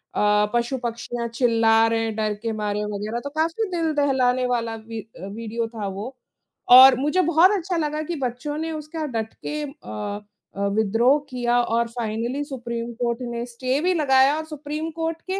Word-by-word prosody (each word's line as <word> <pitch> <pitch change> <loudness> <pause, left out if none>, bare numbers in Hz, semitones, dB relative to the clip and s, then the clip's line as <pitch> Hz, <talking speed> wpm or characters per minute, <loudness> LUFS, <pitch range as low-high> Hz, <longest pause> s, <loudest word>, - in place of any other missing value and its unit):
अ, 210 0 +3
पशु-पक्षियाँ 240 -1 -2
चिल्ला 225 -2 +4
रहे 225 0 0
हैं 220 -1 -3
डर 215 -1 0
के 225 - -1
मारे 210 0 -1
वगैरह 215 +3 -3
तो 285 - -4
काफ़ी 330 +8 -1
दिल 330 -2 0
दहलाने 255 -3 +2
वाला 230 -2 -1
वि 225 0 -7 0.2
अ, 185 - -7
विडिओ 230 +1 -3
था 220 -3 -5
वो। 205 +7 -6 0.6
और 260 +1 +10
मुझे 300 +7 +2
बहुत 340 +3 +5
अच्छा 355 -1 -2
लगा 305 -1 -1
कि 340 +2 -4
बच्चों 255 +5 -3
ने 320 +1 -3
उसका 310 +1 -5
डट 220 0 -3
के 300 0 -3
अ 205 - -6 0.3
अ, 200 0 -1
विद्रोह 225 +7 +3
किया 245 -1 +1
और 235 0 0
फ़ाइनली 235 +4 -3
सुप्रीम 235 -4 -5
कोर्ट 235 +1 -1
ने 235 0 -3
स्टे 255 +3 -2
भी 365 +1 +2
लगाया 275 -3 +4
और 315 - -4
सुप्रीम 305 +1 -5
कोर्ट 325 0 -3
के 390 - -1
245 Hz, 180 wpm, -23 LUFS, 225-300 Hz, 0.6 s, और